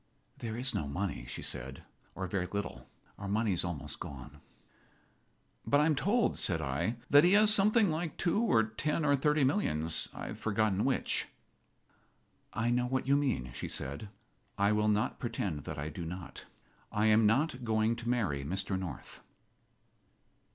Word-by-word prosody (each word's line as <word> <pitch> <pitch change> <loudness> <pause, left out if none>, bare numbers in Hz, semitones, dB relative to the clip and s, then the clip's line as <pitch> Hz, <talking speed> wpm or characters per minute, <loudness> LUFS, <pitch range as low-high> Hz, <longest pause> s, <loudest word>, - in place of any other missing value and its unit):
"There 115 -1 -5
is 130 +2 -1
no 75 - -2
money," 85 -4 -3
she - - -6
said, 65 +2 0 0.3
"or 95 - -3
very 90 0 -2
little. 85 -12 -5 0.3
Our 100 - -5
money 105 0 +1
is 85 - +2
almost 85 -5 -5
gone." 70 +1 -9 1.2
"But 145 - +3
I 150 - +4
am 160 - +3
told," 205 - +1
said 85 -4 +2
I, 80 - -1 0.2
"that 145 +1 +8
he 180 +2 +5
has 215 +1 +7
something 210 -1 +4
like 160 0 -3
two 180 +5 +1
or 115 - +3
ten 150 +8 -2
or 145 -1 +4
thirty 150 +1 +2
millions 80 - +1
I - - -7
have - - -7
forgotten 105 -2 0
which." 135 - 0 1.2
"I 115 +2 0
know 125 0 +1
what 130 +1 -1
you 140 - +4
mean," 130 - -1
she - - -5
said. 70 +9 -5 0.5
"I 100 +1 +3
will 105 0 +2
not 105 +2 0
pretend 105 - -3
that - - -6
I 75 +2 -4
do 85 +3 -7
not. 90 +1 -8 0.5
I 105 +1 +1
am 110 0 +5
not 130 +3 +1
going 110 0 +1
to 120 0 -5
marry 95 - 0
Mr. 95 +5 -2
North." 90 -8 -7
110 Hz, 170 wpm, -31 LUFS, 85-135 Hz, 1.2 s, that